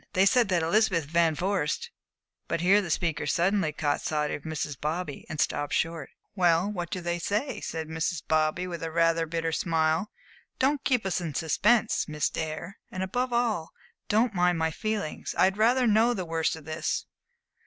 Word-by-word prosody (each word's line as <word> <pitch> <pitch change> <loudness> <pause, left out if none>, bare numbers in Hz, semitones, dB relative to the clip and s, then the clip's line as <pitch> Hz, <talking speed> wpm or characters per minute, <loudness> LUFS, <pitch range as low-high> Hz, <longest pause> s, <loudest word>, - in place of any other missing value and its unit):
They 190 0 +4
say 250 +5 +5
that 185 -7 +1
Elizabeth 180 -2 +2
Van 165 +1 +2
Vorst" 185 -3 -1 0.6
But 170 - -1
here 195 +4 +5
the 180 - -6
speaker 155 -2 -1
suddenly 175 +1 +2
caught 150 -1 -1
sight 150 -1 -1
of - - -4
Mrs. 155 -2 -3
Bobby, 155 0 -3
and 155 - -5
stopped 145 0 0
short. 165 -3 -1 0.2
"Well, 180 +1 +3
what 175 -4 -4
do 185 - -4
they 175 0 -2
say?" 210 - -2
said 160 -1 -4
Mrs. 160 0 -2
Bobby, 155 +3 +1
with 170 -2 -6
rather 165 0 +2
a - - -14
bitter 165 0 -2
smile. 160 +3 +1 0.5
"Don't 275 +1 +1
keep 250 -6 +1
us 185 -1 0
in 160 -5 -4
suspense, 210 +9 +2
Miss 150 -2 -1
Dare, 160 +4 -5
and 185 - -4
above 245 +7 -1
all, 230 -9 0 0.4
don't 220 +2 +3
mind 180 -1 +2
my 160 0 0
feelings. 210 -2 -3
I - - +6
would 190 +1 +1
rather 245 +4 +4
know 230 +2 +4
the 185 - -3
worst 165 -1 0
of 160 -2 -12
this." 155 +1 -2
170 Hz, 185 wpm, -27 LUFS, 160-200 Hz, 0.6 s, I